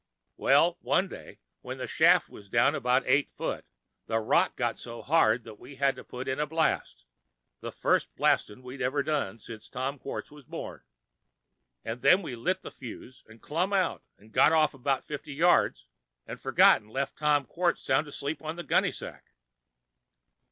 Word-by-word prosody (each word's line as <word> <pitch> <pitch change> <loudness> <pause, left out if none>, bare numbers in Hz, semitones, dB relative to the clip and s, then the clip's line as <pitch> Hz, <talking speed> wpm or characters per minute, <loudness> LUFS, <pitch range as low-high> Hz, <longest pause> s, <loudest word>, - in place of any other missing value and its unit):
Well, - - +3
one - - +1
day - - -12 0.2
when - - -7
the - - -4
shaft - - +4
was 100 -1 -14
down 120 +3 +3
about 125 +2 +1
eight 140 +3 +2
foot, - - -4 0.4
the 115 - 0
rock 110 - +2
got - - -2
so 120 -1 -8
hard 125 -7 +3
that 110 -2 -12
we 135 +3 -12
had 135 0 +1
to - - -10
put 125 +1 -7
in 130 +1 -2
a 150 - 0
blast—the 65 - -4
first - - 0
blast'n' 115 +5 +1
we'd 130 +2 -8
ever 135 +3 0
done 145 -9 -1
since 110 0 -11
Tom 135 +2 -4
Quartz 135 - -6
was 150 -1 -14
born. - - -7 1.0
An' 115 +2 -4
then 180 +10 +5
we 135 -7 -5
lit 185 +11 -1
the - - -8
fuse 125 0 -11
'n' 115 +1 -16
clumb 175 +6 -1
out 190 -3 +1 0.2
'n' 105 +2 -20
got 110 - +5
off 155 -2 +4
'bout 135 0 -1
fifty 145 -1 -7
yards—'n' 155 - 0
forgot - - +5
'n' 105 - -22
left 135 +4 -3
Tom 150 -2 +2
Quartz 175 +3 -1
sound 140 +4 +1
asleep 145 +1 -5
on 155 +1 -5
the 175 - -6
gunny - - +2
sack. - - -10
135 Hz, 175 wpm, -28 LUFS, 115-150 Hz, 1.0 s, then